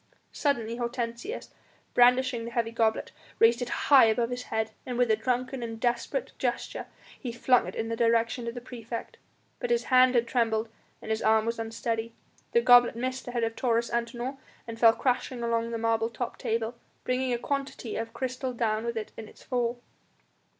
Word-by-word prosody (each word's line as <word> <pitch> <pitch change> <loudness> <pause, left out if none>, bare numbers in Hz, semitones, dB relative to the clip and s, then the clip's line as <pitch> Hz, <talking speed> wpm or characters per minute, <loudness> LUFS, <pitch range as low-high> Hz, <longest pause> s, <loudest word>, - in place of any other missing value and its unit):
Suddenly 235 -6 -1
Hortensius, 240 - -4 0.4
brandishing 250 -1 +4
the - - -4
heavy 235 -1 -1
goblet, 225 -1 0 0.3
raised 235 +2 +5
it 245 - -2
high 275 -4 +6
above 230 +2 +1
his 245 0 -3
head, 220 0 -2
and 250 -2 -4
with 245 -2 +3
a - - +5
drunken 250 +3 -2
and 225 -1 -5
desperate 245 - -1
gesture - - -2 0.3
he 250 - -4
flung 250 +1 +3
it - - -6
in 225 - -2
the 230 - -1
direction 230 +1 +1
of 235 - -4
the 245 - -6
praefect, 235 -2 -7 0.4
but - - -3
his 475 0 +2
hand 255 0 +6
had 235 -1 +4
trembled 225 -2 0 0.3
and 220 - -4
his 220 - 0
arm 220 0 +3
was 230 0 -2
unsteady. 225 0 -3 0.4
The 470 - +4
goblet 245 - +6
missed 255 +2 -3
the 245 - -5
head 240 -1 -1
of 225 0 -1
Taurus 235 -2 0
Antinor 240 +3 -3 0.3
and 230 0 -7
fell 230 -1 +7
crashing 250 0 -1
along 230 0 0
the 230 - -3
marble 225 0 +1
topped 235 +1 -5
table, 225 +1 -1 0.3
bringing 255 0 0
a 240 - +1
quantity 275 -3 -3
of 225 0 -3
crystal 255 +1 -3
down 220 -2 0
with 235 -1 -2
it 215 - -4
in 220 - -7
its - - -16
fall. 240 -1 -1
235 Hz, 190 wpm, -28 LUFS, 230-250 Hz, 0.4 s, fell